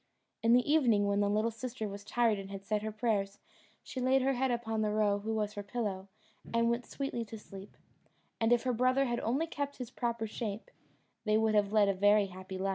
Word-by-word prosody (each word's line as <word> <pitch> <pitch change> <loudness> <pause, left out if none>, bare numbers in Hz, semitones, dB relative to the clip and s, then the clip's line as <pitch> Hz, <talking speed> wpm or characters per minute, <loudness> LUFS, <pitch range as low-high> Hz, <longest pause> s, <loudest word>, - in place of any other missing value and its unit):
In 230 +1 +4
the 250 +2 +4
evening, 235 -10 +4
when 200 0 +1
the 205 0 +2
little 215 +3 +1
sister 230 -1 -5
was 200 0 -7
tired 220 0 +1
and 195 0 -8
had 195 0 -8
said 210 0 0
her 215 0 -3
prayers, 210 -3 -1 0.5
she 255 - -5
laid 260 +1 +3
her 270 +1 +2
head 265 +1 0
upon 225 -2 -1
the 215 - +1
roe, 210 -1 +2
who 220 +2 -4
was 210 -1 -1
her 205 - -5
pillow, 200 -2 -3 0.4
and 230 0 +2
went 235 +1 -2
sweetly 275 -4 -3
to 225 +1 -8
sleep; 195 -1 -12 0.6
and 225 +1 +2
if 240 -1 +4
her 255 - 0
brother 255 +3 +3
had 240 -2 -1
only 265 +8 0
kept 285 -3 -4
his 250 -2 -6
proper 235 -3 -2
shape, 215 -1 -5 0.5
they 215 -1 +2
would 220 0 +2
have 205 -1 +2
led 210 -2 +4
a 200 - +3
very 205 +2 +4
happy 185 0 -8
life. 195 +1 -1
220 Hz, 225 wpm, -32 LUFS, 205-240 Hz, 0.6 s, In